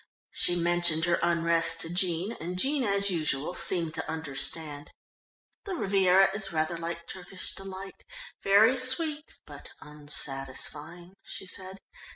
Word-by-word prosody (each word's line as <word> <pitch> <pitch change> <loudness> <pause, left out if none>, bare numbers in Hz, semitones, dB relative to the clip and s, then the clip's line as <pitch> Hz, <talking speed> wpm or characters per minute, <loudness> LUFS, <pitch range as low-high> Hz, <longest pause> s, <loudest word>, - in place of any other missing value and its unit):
She 175 - +1
mentioned 170 -1 +2
her 175 -1 +1
unrest 165 -1 +2
to 165 +1 -3
Jean, 180 +2 0
and 180 +2 -5
Jean 275 +7 +1
as 200 -2 +1
usual 155 -2 -1
seemed 170 -4 +1
to - - -4
understand. 150 -1 -2 0.8
"The 390 -3 -4
Riviera 195 - +4
is 195 -2 -1
rather 160 +1 -1
like 170 0 -6
Turkish 185 0 -3
Delight 195 0 -9 0.4
very 215 +6 +5
sweet, 295 +4 +2
but - - -12
unsatisfying," 150 +3 -3
she - - -7
said. 190 0 -6
175 Hz, 130 wpm, -28 LUFS, 165-195 Hz, 0.8 s, very